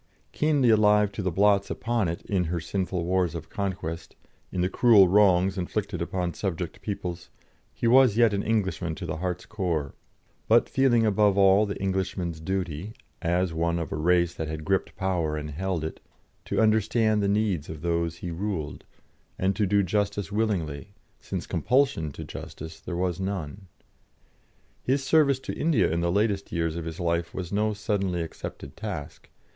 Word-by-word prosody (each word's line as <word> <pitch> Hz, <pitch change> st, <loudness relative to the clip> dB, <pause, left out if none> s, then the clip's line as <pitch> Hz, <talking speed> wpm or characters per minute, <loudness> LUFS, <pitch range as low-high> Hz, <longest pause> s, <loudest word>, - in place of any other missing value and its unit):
Keenly 145 Hz, -6 st, +3 dB
alive 105 Hz, -1 st, +4 dB
to 105 Hz, -, -5 dB
the 95 Hz, -, 0 dB
blots 100 Hz, +2 st, +3 dB
upon 115 Hz, -4 st, -1 dB
it 85 Hz, +1 st, -4 dB
in 95 Hz, -3 st, 0 dB
her 85 Hz, +1 st, -2 dB
sinful 90 Hz, +1 st, -2 dB
wars 90 Hz, -2 st, +1 dB
of 80 Hz, -1 st, -7 dB
conquest, 90 Hz, -4 st, -4 dB, 0.4 s
in 90 Hz, -, -1 dB
the 90 Hz, -, +2 dB
cruel 100 Hz, -1 st, +6 dB
wrongs 95 Hz, -1 st, +4 dB
inflicted 95 Hz, 0 st, -3 dB
upon 90 Hz, 0 st, -2 dB
subject 90 Hz, -3 st, -4 dB
peoples, 90 Hz, -4 st, -5 dB, 0.4 s
he -, -, -5 dB
was 125 Hz, -2 st, +5 dB
yet 115 Hz, -3 st, +5 dB
an 100 Hz, -, 0 dB
Englishman 95 Hz, -6 st, -1 dB
to 90 Hz, -, -6 dB
the 80 Hz, -2 st, -3 dB
heart's 90 Hz, +1 st, -3 dB
core, 85 Hz, -9 st, -2 dB, 0.5 s
but 115 Hz, +1 st, +5 dB
feeling 120 Hz, -4 st, +3 dB
above 105 Hz, -1 st, +3 dB
all 100 Hz, +2 st, +5 dB
the 100 Hz, -, -5 dB
Englishman's 95 Hz, -3 st, -2 dB
duty, 95 Hz, +2 st, -3 dB, 0.3 s
as 90 Hz, 0 st, 0 dB
one 85 Hz, +1 st, 0 dB
of 85 Hz, -3 st, -4 dB
a -, -, -2 dB
race 85 Hz, +2 st, +2 dB
that 80 Hz, -, -4 dB
had 80 Hz, 0 st, -5 dB
gripped 95 Hz, +1 st, 0 dB
power 85 Hz, -5 st, -1 dB
and 75 Hz, 0 st, -5 dB
held 90 Hz, +1 st, -2 dB
it, 80 Hz, -, -5 dB, 0.5 s
to -, -, -1 dB
understand 110 Hz, 0 st, +3 dB
the 100 Hz, -, +1 dB
needs 100 Hz, -6 st, 0 dB
of 80 Hz, -1 st, -7 dB
those 85 Hz, -1 st, 0 dB
he 85 Hz, -, -5 dB
ruled, 85 Hz, -4 st, -4 dB, 0.5 s
and 95 Hz, +1 st, +1 dB
to 105 Hz, 0 st, +1 dB
do 100 Hz, +1 st, +3 dB
justice 100 Hz, +1 st, -1 dB
willingly, 100 Hz, -5 st, -2 dB, 0.2 s
since -, -, -5 dB
compulsion 125 Hz, -, +1 dB
to -, -, -8 dB
justice 80 Hz, +1 st, -8 dB
there 85 Hz, -, -5 dB
was 90 Hz, -1 st, -1 dB
none. 95 Hz, -1 st, -4 dB, 1.1 s
His 135 Hz, +2 st, 0 dB
service 140 Hz, -1 st, +4 dB
to -, -, -5 dB
India 160 Hz, -, +2 dB
in 85 Hz, +1 st, 0 dB
the 85 Hz, 0 st, +1 dB
latest 100 Hz, 0 st, 0 dB
years 85 Hz, -1 st, -1 dB
of 85 Hz, -1 st, -4 dB
his 80 Hz, -1 st, -6 dB
life 85 Hz, -1 st, -1 dB
was 90 Hz, 0 st, -5 dB
no 105 Hz, +1 st, +1 dB
suddenly 100 Hz, -4 st, -1 dB
accepted 70 Hz, -3 st, -8 dB
task. 100 Hz, -9 st, -7 dB
95 Hz, 175 wpm, -26 LUFS, 85-105 Hz, 1.1 s, cruel